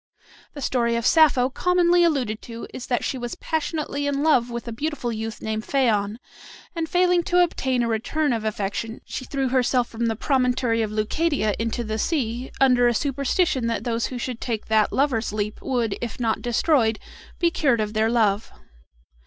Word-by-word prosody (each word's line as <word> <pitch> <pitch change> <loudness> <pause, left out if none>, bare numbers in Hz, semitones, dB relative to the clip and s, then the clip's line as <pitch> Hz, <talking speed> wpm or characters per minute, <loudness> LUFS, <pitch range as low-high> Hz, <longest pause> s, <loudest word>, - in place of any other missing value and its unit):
The 285 - -7
story 235 -2 +1
of 235 0 -2
Sappho 280 -5 +4
commonly 355 +3 +3
alluded 255 -10 0
to 230 -1 -8
is 250 - -7
that 245 - 0
she 260 - -2
was 240 -1 -5
passionately 305 -2 -2
in 285 0 0
love 255 -7 +3
with 235 0 -6
a - - -3
beautiful 260 0 -3
youth 220 0 -5
named 220 0 -2
Phaon, 220 -6 +1 0.6
and 325 -1 -2
failing 360 0 +3
to 355 0 +4
obtain 260 -7 0
a - - 0
return 245 +6 0
of 225 -2 -2
affection 215 +2 -3
she 260 - -6
threw 270 -1 -1
herself 250 -1 +2
from 230 +1 -2
the 225 - 0
promontory 250 -2 +1
of 220 - -1
Leucadia 215 +2 0
into 230 +1 -2
the 220 0 -3
sea, 250 -3 -1
under 250 -2 +5
a 240 - +2
superstition 275 - 0
that 230 - -2
those 230 -2 -1
who 255 - -6
should 245 -1 -5
take 225 -4 -3
that 215 -1 +3
"Lover's 255 -6 +1
leap" 210 0 -3
would, 235 -6 -1
if 235 0 -5
not 225 -2 0
destroyed, 240 -2 +2 0.4
be 340 -1 +2
cured 270 -8 +2
of 215 0 -2
their 220 +1 +2
love. 220 -3 +1
245 Hz, 185 wpm, -23 LUFS, 225-280 Hz, 0.6 s, under